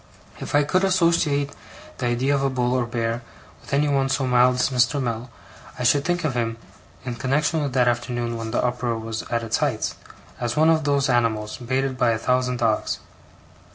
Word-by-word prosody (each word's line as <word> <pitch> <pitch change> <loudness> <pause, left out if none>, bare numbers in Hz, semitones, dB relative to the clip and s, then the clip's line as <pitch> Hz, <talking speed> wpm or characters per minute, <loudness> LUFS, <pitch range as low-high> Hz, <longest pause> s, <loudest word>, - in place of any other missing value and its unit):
If - - -4
I 145 - +5
could 185 +6 +1
associate 165 -6 +2 0.5
the 125 - 0
idea 125 +4 +1
of 140 - +1
a 135 - +1
bull 125 -1 0
or 125 -2 +1
a - - -10
bear 115 0 -2 0.4
with - - -13
anyone 140 -1 +2
so 135 0 0
mild 125 0 +4
as 125 - +1
Mr. 125 +2 +2
Mell, 120 -1 -3 0.5
I 125 - -3
should 140 +3 +3
think 175 +2 -1
of 155 -4 0
him, 115 -2 -2 0.5
in 125 - -3
connexion 145 +6 0
with 140 -3 -2
that 125 -2 +3
afternoon 120 0 -1
when 115 -1 -4
the 110 - 0
uproar 125 -1 -1
was 110 0 -4
at 115 -1 -1
its 115 -1 0
height, - - -1 0.5
as 120 -1 -1
of - - -9
one 160 +1 +5
of 160 -2 +1
those 140 -1 +2
animals, 115 -4 0
baited 130 +1 -2
by 120 - +3
a - - -1
thousand 125 +1 0
dogs. 115 -3 0
125 Hz, 205 wpm, -23 LUFS, 120-140 Hz, 0.5 s, I